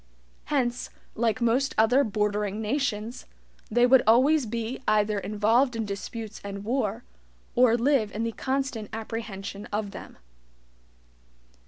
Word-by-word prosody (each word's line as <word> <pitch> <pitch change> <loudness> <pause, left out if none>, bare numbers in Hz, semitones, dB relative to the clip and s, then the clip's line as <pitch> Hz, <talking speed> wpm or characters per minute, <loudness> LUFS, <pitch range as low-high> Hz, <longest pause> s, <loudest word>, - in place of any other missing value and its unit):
Hence, 250 -4 -1 0.2
like 230 +1 0
most 245 +4 +1
other 245 +6 +5
BORDERING 210 -2 -1
nations, 230 -1 -2 0.4
they 240 +3 +4
would 255 0 +6
always 260 +4 +5
be 230 +3 -4
either 210 -1 +2
involved 225 +6 +2
in 225 -1 -2
disputes 215 +2 -6
and 200 0 -6
war, 230 -1 -1 0.5
or 245 -2 +5
live 240 -4 +2
in 220 - -3
the 230 - -1
constant 260 -4 -2
apprehension 215 -3 -6
of 205 -1 -3
them. - - -10
225 Hz, 125 wpm, -27 LUFS, 210-250 Hz, 0.5 s, would